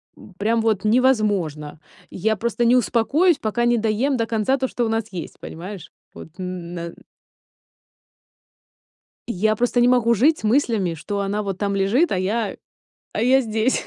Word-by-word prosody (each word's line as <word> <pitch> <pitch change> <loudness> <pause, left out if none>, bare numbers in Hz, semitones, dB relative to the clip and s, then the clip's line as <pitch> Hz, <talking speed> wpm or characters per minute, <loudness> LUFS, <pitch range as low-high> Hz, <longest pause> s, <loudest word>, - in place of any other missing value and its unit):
м, 200 - -15
прям 225 +3 +1
вот 215 -3 0
невозможно. 205 - +1 0.3
Я 220 +4 -1
просто 235 +3 -1
не 235 +1 +4
успокоюсь, 280 +8 +2
пока 235 +2 -1
не 240 0 +3
доем 225 +5 0
до 230 - 0
конца 225 +4 0
то, 260 0 -1
что 245 -1 -2
у - - -1
нас 225 0 -2
есть. 175 -4 -7
Понимаешь? 180 +1 -9 0.2
Вот - - -10
н 180 -2 -6
на 170 -1 -6 2.4
Я 215 0 +1
просто 245 +1 +1
не 245 - +5
могу 240 -2 +3
жить 285 +9 +3
с - - -13
мыслями, 220 -6 +1
что 200 +6 -5
она 200 +1 -2
вот 195 -2 -4
там 200 0 -1
лежит, 215 - +2
а - - 0
я, 205 +2 -1 0.6
а - - -2
я 260 +3 +4
здесь. 225 +2 0
220 Hz, 170 wpm, -22 LUFS, 195-240 Hz, 2.4 s, не